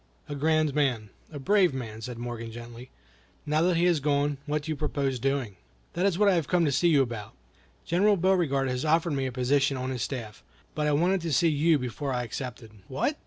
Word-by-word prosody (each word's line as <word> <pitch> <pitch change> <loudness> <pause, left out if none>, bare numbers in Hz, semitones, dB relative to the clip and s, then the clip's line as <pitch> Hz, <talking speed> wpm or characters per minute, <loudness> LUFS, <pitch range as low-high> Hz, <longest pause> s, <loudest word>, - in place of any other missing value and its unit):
"A - - -5
grand 155 0 +1
man, 125 -8 0 0.2
a 150 - -7
brave 180 +1 +3
man," 110 -4 -6
said 120 +1 -6
Morgan, 120 -1 -6
gently. 120 +2 -10 0.6
"Now 150 +1 +1
that 175 0 +2
he 170 - +3
has 175 -3 +3
gone, 145 0 0
what 150 0 -1
do 160 - -4
you - - -1
propose 140 -3 -2
doing?" 135 -6 -1 0.4
"That 180 +3 +1
is 185 -4 0
what 210 +1 +4
I 200 - +5
have 165 -5 0
come 175 -2 +2
to 145 - +1
see 145 +6 +2
you 145 -5 +5
about. 115 -5 -7 0.5
General 200 +4 +3
Beauregard 170 -7 +2
has 125 0 -2
offered 160 +1 +2
me 135 -1 -1
a - - -4
position 135 +2 +1
on 130 +1 -3
his 125 -2 -4
staff, 110 -5 -5 0.3
but 150 -1 -1
I - - +2
wanted 175 +6 +2
to 165 -1 -3
see 165 +5 +3
you 155 +1 +3
before 125 +2 -4
I 125 -1 -1
accepted." 120 -1 -7 0.2
"What! 145 - -1
140 Hz, 220 wpm, -27 LUFS, 125-165 Hz, 0.6 s, I